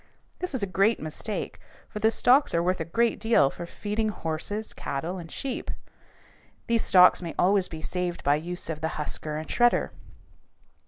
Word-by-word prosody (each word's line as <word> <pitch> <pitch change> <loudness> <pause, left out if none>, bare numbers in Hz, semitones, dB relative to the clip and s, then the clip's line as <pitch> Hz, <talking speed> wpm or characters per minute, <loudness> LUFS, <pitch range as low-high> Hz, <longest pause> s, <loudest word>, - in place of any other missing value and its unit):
This 365 -6 -3
is 240 - 0
a - - +3
great 195 +4 +2
mistake, 155 +7 -5 0.3
for 210 - -7
the 220 +1 +4
stalks 250 - +3
are 170 - +2
worth 185 +1 0
a 160 - -2
good 230 +8 +1
deal 220 -11 +3
for 170 - -8
feeding 215 +4 -2
horses, 205 +4 -4
cattle, 170 +7 -4
and 165 -2 -10
sheep. 265 -3 -4 1.0
These 230 -1 +2
stalks 180 0 +6
may 170 -2 -6
always 190 0 +3
be 160 -1 -8
saved 180 0 -3
by 145 +1 +3
the 160 - -11
use 180 0 -5
of 160 -1 -4
the 160 - 0
husker 150 0 -3
and 155 - -6
shredder. 240 0 +2
180 Hz, 180 wpm, -27 LUFS, 160-220 Hz, 1.0 s, stalks